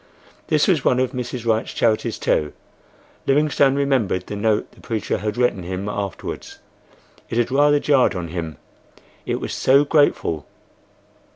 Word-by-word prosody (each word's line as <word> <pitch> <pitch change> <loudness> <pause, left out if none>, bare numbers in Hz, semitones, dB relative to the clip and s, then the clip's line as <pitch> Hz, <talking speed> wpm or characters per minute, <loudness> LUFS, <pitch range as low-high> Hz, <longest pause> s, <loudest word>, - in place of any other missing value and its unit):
This - - +2
was - - +2
one 125 - +3
of 130 -1 +1
Mrs. 125 -2 -5
Wright's 110 -1 0
charities 110 -2 +1
too. 75 -1 0 0.7
Livingstone 140 -1 +3
remembered 130 -10 0
the - - -6
note 105 +1 0
the - - -19
preacher 110 -2 -2
had 105 +2 -3
written 120 -6 +1
him 95 +3 -5
afterwards—it 100 +3 -8
had 120 +1 +1
rather 145 +2 +4
jarred 140 -7 +3
on 85 -2 -4
him, 80 -2 -5 0.7
it - - -1
was - - -5
so 140 +2 +4
grateful. 145 - +1
115 Hz, 145 wpm, -21 LUFS, 100-135 Hz, 0.7 s, rather